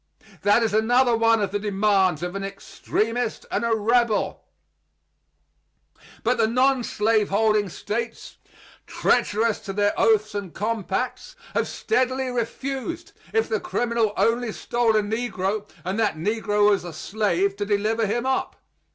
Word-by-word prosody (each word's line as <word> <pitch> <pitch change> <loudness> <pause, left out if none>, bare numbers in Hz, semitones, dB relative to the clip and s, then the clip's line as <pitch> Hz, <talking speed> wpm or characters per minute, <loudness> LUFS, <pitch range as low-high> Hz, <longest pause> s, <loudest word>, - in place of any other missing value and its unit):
That 205 +3 +4
is 220 - 0
another 240 +3 +3
one 225 -1 +3
of 195 - -2
the 205 - -1
demands 195 -5 +1
of 175 0 -3
an 195 - -3
extremist 220 +4 -3
and 210 - 0
a 230 -1 +2
rebel. 230 +1 +1 1.8
But 245 +2 +1
the 225 - +4
nonslaveholding 220 -4 +2
States, 230 +6 -5 0.5
treacherous 220 +1 +1
to 195 - -6
their 205 +1 +2
oaths 215 -1 +3
and 200 -4 -5
compacts, 230 +4 -3 0.2
have - - 0
steadily 260 - 0
refused, 270 - -4 0.2
if 445 0 +1
the 450 - -1
criminal 235 - 0
only 235 0 +1
stole 235 -2 0
a 215 - +3
negro 210 -2 -2 0.2
and 190 +4 -2
that 215 -6 +1
negro 210 +3 +2
was 200 - +1
a 175 -2 -7
slave, 200 -1 0
to 205 - -2
deliver 215 +2 +1
him 240 +4 -1
up. 265 0 -1
220 Hz, 135 wpm, -24 LUFS, 205-240 Hz, 1.8 s, That